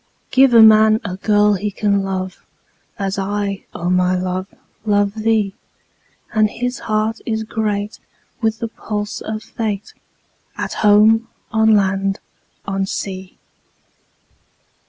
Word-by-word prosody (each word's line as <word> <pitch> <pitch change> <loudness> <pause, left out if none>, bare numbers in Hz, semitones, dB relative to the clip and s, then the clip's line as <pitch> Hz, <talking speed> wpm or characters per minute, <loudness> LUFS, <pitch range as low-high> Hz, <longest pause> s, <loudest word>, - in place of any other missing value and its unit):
Give 265 0 +5
a 225 - +9
man 215 0 +6
a 185 -3 -3
girl 210 +1 +3
he 205 +2 -2
can 200 0 0
love, 190 -1 -4 0.5
As 195 0 -2
I, 200 0 -3
O 175 +1 -3
my 180 0 +2
love, 185 +1 -2 0.4
love 205 -1 +1
thee; 215 -2 0 0.8
10 215 - -1
And 215 0 +4
his 245 +3 -3
heart 215 +1 -1
is 220 -1 -2
great 210 -2 -3 0.4
with 220 -1 0
the 230 - -3
pulse 210 -1 -5
of 215 0 -5
Fate, 215 -3 -4 0.6
At - - -3
home, 215 +2 +5 0.2
on 220 -1 +4
land, 195 -1 +1 0.5
on 195 -1 -2
sea. 190 -1 -5
210 Hz, 130 wpm, -19 LUFS, 195-220 Hz, 0.8 s, a